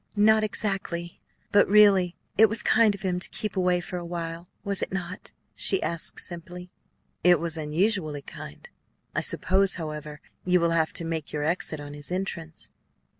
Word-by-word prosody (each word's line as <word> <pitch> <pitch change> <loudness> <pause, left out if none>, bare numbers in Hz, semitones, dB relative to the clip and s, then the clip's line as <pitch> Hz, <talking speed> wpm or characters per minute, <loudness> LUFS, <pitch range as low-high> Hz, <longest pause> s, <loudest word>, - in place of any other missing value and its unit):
"Not 215 +1 +5
exactly. 195 -5 -3 0.3
But 205 - +5
really 195 -4 +5 0.2
it 220 +1 +6
was 220 +2 +1
kind 220 -2 +4
of 200 - -12
him 180 -2 0
to - - -4
keep 210 -2 -4
away 180 -1 +2
for 180 +1 -6
a 175 - -5
while, 170 0 -5
was 200 -2 +3
it - - -2
not?" 180 -1 -5 0.2
she 385 - +3
asked 170 -1 -1
simply. 180 +1 -8 0.5
"It 175 -1 +6
was 165 -1 -2
unusually 155 -1 0
kind. 75 - -10 0.5
I - - 0
suppose, 195 +1 +1
however, 150 -3 -6 0.2
you 180 0 +3
will 170 0 +2
have 160 -1 +1
to 170 - -4
make 160 -2 -4
your 150 -1 -2
exit 160 -1 0
on 145 0 -8
his 145 +2 -6
entrance." 170 -4 -4
175 Hz, 175 wpm, -26 LUFS, 165-195 Hz, 0.5 s, it